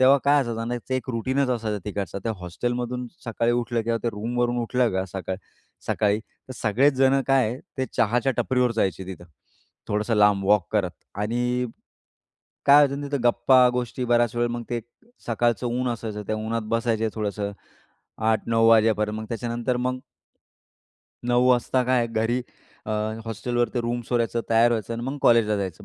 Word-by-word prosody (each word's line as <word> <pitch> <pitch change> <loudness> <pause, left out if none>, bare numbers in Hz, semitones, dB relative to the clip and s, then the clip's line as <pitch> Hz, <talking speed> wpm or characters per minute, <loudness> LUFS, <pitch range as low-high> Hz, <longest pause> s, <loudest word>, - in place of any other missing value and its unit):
तेव्हा 135 +2 +6
काय 145 0 +5
असायचं 115 -2 -4
आणि 115 - -3
त्याचं 130 - -5
एक 130 0 -2
रूटीनच 130 +3 0
असायचं 110 -4 -1
तिकडचं. 100 -2 -4
त्या 115 - 0
हॉस्टेलमधून 120 +7 -3 0.2
सकाळी 115 0 0
उठलं 120 -1 0
किंवा 115 +1 0
त्या 120 - 0
रूमवरून 120 +3 -1
उठलं 125 0 +1
का 95 0 0
सकाळ 95 -1 -4 0.5
सकाळी 105 0 +1
तर 130 +3 -15
सगळेच 125 +7 +3
जणं 135 +1 +3
काय 135 -1 +4
आहे, 125 - -5 0.2
ते 130 - +1
चहाच्या 120 +4 +2
टपरीवर 125 -2 +2
जायचे 95 -4 -1
तिथं. 90 -2 -8 0.6
थोडंसं 105 +2 0
लांब 105 -1 +4
वॉक 105 -3 +4
करत. 100 -5 +1 0.2
आणि, 120 +4 -1 1.0
काय 140 - +8
व्हायचं 140 -1 +4
ना 145 - -4
तिथं 140 -3 -2
गप्पा, 125 +1 +5
गोष्टी 125 0 -2
बऱ्याच 120 -1 +2
वेळेला 120 0 +1
मग 120 - -6
ते 120 -1 -1 0.5
सकाळच 120 +1 +1
ऊन 125 +1 -1
असायचं. 110 -3 -4
त्या 110 - -1
उन्हात 110 +1 -2
बसायचं 115 -1 0
थोडंसं, 105 -1 -3 0.8
8-9 115 +1 +2
वाजेपर्यंत. 110 -1 +3
मग 110 - -5
त्याच्यानंतर 120 +1 -2
मग 125 +1 -2 1.2
9 125 +1 +3
काय 125 -2 +2
घरी 115 +2 0 0.5
अ, - - -4 0.3
हॉस्टेलवरती 120 +2 -1
रूम 120 +1 -2
सोडायचं, 115 -1 0
तयार 115 +1 +5
व्हायचं 115 -1 -2
आणि 115 - -5
मग 135 +3 -3
कॉलेजला 115 -3 +4
जायचं. 95 -4 -4
120 Hz, 165 wpm, -24 LUFS, 110-125 Hz, 1.2 s, काय